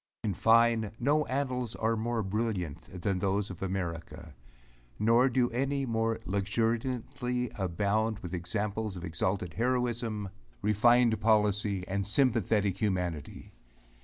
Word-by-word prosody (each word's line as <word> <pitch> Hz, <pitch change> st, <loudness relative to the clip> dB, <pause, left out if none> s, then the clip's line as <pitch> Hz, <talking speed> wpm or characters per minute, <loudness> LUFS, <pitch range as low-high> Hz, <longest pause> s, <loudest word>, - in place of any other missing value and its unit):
In 105 Hz, -, 0 dB
fine, 115 Hz, +1 st, +3 dB
no 150 Hz, +4 st, +2 dB
annals 130 Hz, -3 st, -2 dB
are 115 Hz, +1 st, 0 dB
more 115 Hz, 0 st, -1 dB
brilliant 95 Hz, -5 st, -3 dB
than 100 Hz, -3 st, 0 dB
those 100 Hz, +1 st, 0 dB
of 90 Hz, -, -10 dB
America; 90 Hz, -4 st, -4 dB, 0.6 s
nor 115 Hz, +4 st, +4 dB
do 125 Hz, 0 st, +1 dB
any 135 Hz, +3 st, 0 dB
more 115 Hz, -1 st, 0 dB
luxuriantly 120 Hz, +5 st, -1 dB
abound 105 Hz, +4 st, 0 dB
with 90 Hz, -3 st, -8 dB
examples 100 Hz, +4 st, -2 dB
of 90 Hz, 0 st, -6 dB
exalted 90 Hz, +1 st, -2 dB
heroism, 120 Hz, -3 st, -1 dB, 0.3 s
refined 115 Hz, +2 st, +4 dB
policy, 105 Hz, -3 st, +2 dB
and 100 Hz, +1 st, -2 dB
sympathetic 105 Hz, -5 st, +2 dB
humanity. 90 Hz, -7 st, -2 dB
110 Hz, 115 wpm, -30 LUFS, 95-120 Hz, 0.6 s, nor